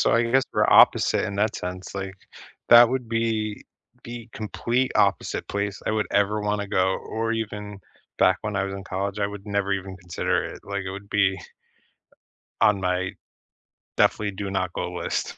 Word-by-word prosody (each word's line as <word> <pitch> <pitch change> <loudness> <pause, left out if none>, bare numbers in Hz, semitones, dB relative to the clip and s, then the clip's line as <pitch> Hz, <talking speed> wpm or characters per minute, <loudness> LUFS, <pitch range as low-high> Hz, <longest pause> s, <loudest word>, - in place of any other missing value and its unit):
so - - +3
I 115 - +4
guess 130 +3 +3
we're - - +2
opposite - - +5
in 100 - -4
that 105 +1 +1
sense, 90 +1 -6
like, 95 0 -4 0.5
that 120 0 +9
would 125 -1 -2
be 110 -2 -1 0.4
the 120 0 -8
complete 115 +4 -1
opposite - - +1
place 100 -1 -2
I - - +2
would 110 -1 0
ever 105 +1 +2
wanna 105 0 -1
go, 95 -1 +1
or 115 +1 -2
even 105 -2 -4 0.4
back - - +4
when 105 -1 -3
I 95 - +1
was 95 0 -4
in 100 0 -7
college, 100 +2 -3
I 100 - +1
would 100 0 -9
never 100 -1 0
even 95 -1 -4
consider 85 -2 -1
it, - - -8
like, 100 -1 -3
it 95 - -4
would 100 +1 -8
be 100 -2 +2 1.2
on 105 -2 +4
my 90 0 0 0.9
definitely 105 -1 +2
do 100 +1 -5
not 95 -2 -2
go - - -3
list. - - -3
100 Hz, 180 wpm, -24 LUFS, 95-110 Hz, 1.2 s, that